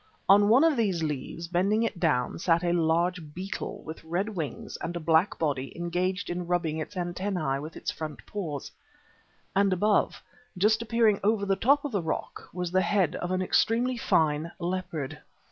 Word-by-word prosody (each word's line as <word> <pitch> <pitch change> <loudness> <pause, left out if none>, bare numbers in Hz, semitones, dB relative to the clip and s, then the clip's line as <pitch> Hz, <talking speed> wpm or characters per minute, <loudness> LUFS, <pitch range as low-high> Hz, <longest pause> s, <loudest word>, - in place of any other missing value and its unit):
On 205 +2 +6
one 250 +7 +6
of 325 -2 +4
these 190 -8 +1
leaves, 150 +3 -4
bending 195 +6 +2
it 220 -5 -2
down, 150 -7 +1
sat 170 0 +2
a 175 0 +1
large 170 -1 0
beetle 190 +2 -5
with 160 +1 -8
red 175 +6 -1
wings 165 -9 -5
and 175 - -5
a - - -2
black 165 +3 +2
body 140 -4 -2
engaged 180 +2 -1
in 175 0 -4
rubbing 170 -3 0
its 160 +6 -6
antennæ 175 -5 -2
with 155 +2 -8
its - - -3
front 155 -2 -7
paws. 160 -9 -5 0.8
And 200 0 +4
above, 205 +3 +1 0.3
just 215 +4 +3
appearing 225 -2 +3
over 210 0 +2
the 195 -1 +2
top 280 +8 +3
of 290 - -3
the 200 -4 0
rock, 160 - -4
was 180 -1 -3
the 185 +1 +3
head 190 -5 +1
of 175 - -4
an 185 0 0
extremely 235 +6 +2
fine 160 -7 +1
leopard. 170 -5 -3
180 Hz, 180 wpm, -28 LUFS, 160-200 Hz, 0.8 s, On